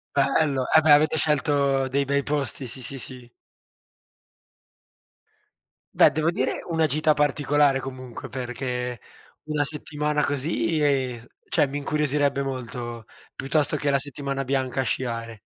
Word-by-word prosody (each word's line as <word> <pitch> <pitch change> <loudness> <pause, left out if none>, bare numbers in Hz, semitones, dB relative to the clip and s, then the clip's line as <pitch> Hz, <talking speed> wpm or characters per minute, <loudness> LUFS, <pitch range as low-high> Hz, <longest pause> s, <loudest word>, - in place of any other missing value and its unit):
Bello. 140 -1 +2
Eh 160 - +8
beh, 155 -1 +4
avete 155 +2 +5
scelto 140 -3 +2
dei 140 +2 0
bei 140 +1 +1
posti, 140 -3 -2
sì, 130 +3 -5
sì, 135 +2 -2
sì. 125 -2 -5 2.7
Beh, - - +7
devo 155 +2 0
dire - - -1
una 160 -1 +2
gita 155 +2 +2
particolare 145 -1 +2
comunque, 130 -2 -8
perché 125 -1 -4 0.4
una 150 -1 0
settimana 150 0 -1
così 155 +3 -1
e 130 -5 0 0.3
cioè 145 - +2
mi 140 +2 -4
incuriosirebbe 145 -1 0
molto, 120 -3 -5 0.3
piuttosto 145 +2 0
che 145 -1 0
la 140 - +2
settimana 140 -1 -4
bianca 130 -1 -1
a - - -1
sciare. 115 -2 -3
140 Hz, 130 wpm, -24 LUFS, 130-150 Hz, 2.7 s, Eh